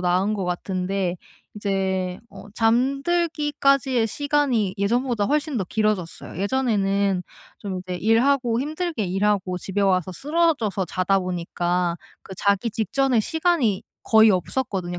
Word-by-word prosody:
나은 185 +4 +1
것 195 - -3
같은데 185 +1 -2 0.4
이제 190 -3 -1
어 200 - -12
잠들기까지의 275 0 +1
시간이 280 -8 0
예전보다 235 +1 +1
훨씬 300 -1 0
더 - - 0
길어졌어요. 210 -5 -2
예전에는 200 -5 +1 0.4
좀 190 -3 -5
이제 180 0 -6
일하고 235 +3 +2
힘들게 310 - -2
일하고 190 -1 0
집에 195 +3 -3
와서 185 -2 +2
쓰러져서 280 - 0
자다 190 +2 +1
보니까 175 -1 -1 0.3
그 190 - -10
자기 200 +3 +1
직전의 240 +3 +1
시간이 320 - +1 0.2
거의 220 -1 +6
없었거든요. 185 -2 -2
205 Hz, 300 characters per minute, -23 LUFS, 185-265 Hz, 0.4 s, 거의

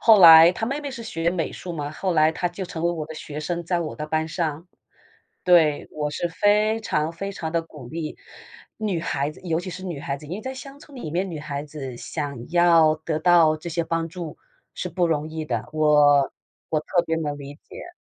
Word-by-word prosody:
后 220 -2 +7
来 165 0 +10
她 225 +5 -3
妹 275 +4 -2
妹 285 - -4
是 240 -3 -7
学 165 -5 -1
美 175 -2 -2
术 175 - -7
嘛， 145 -2 -4
后 185 +3 -2
来 155 0 +4
她 175 +2 -2
就 180 +2 -7
成 165 0 -5
了 175 - +2
我 155 -3 -4
的 160 - -8
学 150 0 -7
生， 170 +2 -3
在 175 0 0
我 160 - -4
的 150 0 -5
班 155 +1 -1
上。 160 0 -3 0.8
对， 160 -5 +4
我 150 -1 -2
是 175 +4 -2
非 210 +4 +2
常 155 -6 -1
非 195 +4 -5
常 160 -4 -5
地 170 - +1
鼓 150 -6 -12
励 160 0 -5 0.6
女 205 -6 -1
孩 140 -3 -1
子， - - -16
尤 165 -2 0
其 185 - -6
是 185 +2 -8
女 170 -6 -4
孩 140 -1 -3
子， 150 - -13
因 175 - -4
为 - - -8
在 260 0 -5
乡 275 +2 -10
村 285 -2 -15
里 160 -12 -6
面， 185 +4 -1
女 165 - -5
孩 145 -1 -5
子 135 -5 -7
想 140 -5 -5
要 165 -3 +5
得 155 0 -3
到 165 -2 +5
这 170 +2 -7
些 170 +1 -1
帮 165 0 -1
助 170 -2 -7 0.4
是 - - -4
不 180 -2 +1
容 155 -1 -1
易 160 0 -4
的， 120 -3 -3
我 150 -2 +4 0.4
我 155 - +1
特 175 +3 +1
别 165 0 0
能 150 -2 -3
理 140 0 -9
解。 350 - -12
165 Hz, 245 characters per minute, -24 LUFS, 150-175 Hz, 0.8 s, 来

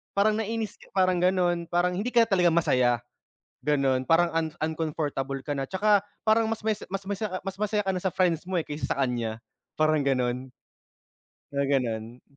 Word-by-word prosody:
parang 210 +2 +3
nainis 225 0 -3 0.2
parang 185 -1 +3
ganon, 175 -2 +1
parang 175 +1 +1
hindi 195 +6 -2
ka 240 -2 +5
talaga 190 -5 +3
masaya 125 -7 +2 0.6
ganon 135 -3 +2
parang 170 +1 +5
an 165 -1 +1 0.2
uncomfortable 150 -4 -2
ka 145 - -4
na 135 - -2
tsaka 205 +2 +3 0.3
parang 220 +1 +4
mas 225 - -2
masi 215 -1 -1
mas 195 - -1
masa 205 +2 -2
ah, - - -21
mas 195 - -3
masaya 210 0 0
ka 195 - 0
na - - -1
sa 190 - +1
friends 170 -3 +1
mo, 190 - -2
eh, - - -2
kaysa 150 0 -5
sa 135 - +1
kanya 115 -3 -2 0.4
parang 155 0 +3
ganon. 125 -1 0 1.0
Mga 140 -1 0
ganun. 120 -3 -1
165 Hz, 180 wpm, -27 LUFS, 135-195 Hz, 1.0 s, ka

